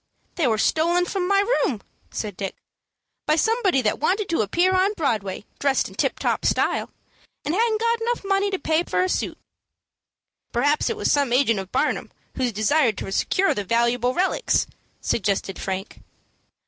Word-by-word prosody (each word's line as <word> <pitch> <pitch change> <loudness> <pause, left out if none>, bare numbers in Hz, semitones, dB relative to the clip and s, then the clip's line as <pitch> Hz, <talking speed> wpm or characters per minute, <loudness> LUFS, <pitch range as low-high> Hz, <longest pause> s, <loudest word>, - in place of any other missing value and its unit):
"They 320 -6 +1
were 220 -2 +2
stolen 340 +9 +2
from 360 0 -2
my 395 +1 +4
room," 405 - +1 0.3
said 210 -4 -5
Dick, 195 +1 -4 0.7
"by 305 - +4
somebody 390 - +2
that 210 - 0
wanted 380 +6 0
to 330 - +1
appear 345 - +2
on 375 +2 +3
Broadway 210 - -2
dressed 275 -1 +1
in - - -13
tip - - -1
top - - -1
style, - - +1 0.6
and 300 - -1
hadn't 440 +2 +2
got 465 -1 0
money 390 +1 +2
enough 400 - -4
to 380 - -1
pay 315 +1 +2
for 350 - 0
a - - +1
suit." - - -2 1.1
"Perhaps 290 +5 +1
it 455 - -2
was - - +1
some 280 -4 +2
agent 240 -4 +3
of 190 -1 -7
Barnum - - 0 0.3
who 255 -2 0
desired 220 +2 +2
to - - -5
secure 380 - +1
the 205 - -3
valuable 235 +4 +1
relics," 380 +7 +1 0.4
suggested 195 -2 -1
Frank. 190 +1 -5
305 Hz, 170 wpm, -23 LUFS, -, 1.1 s, my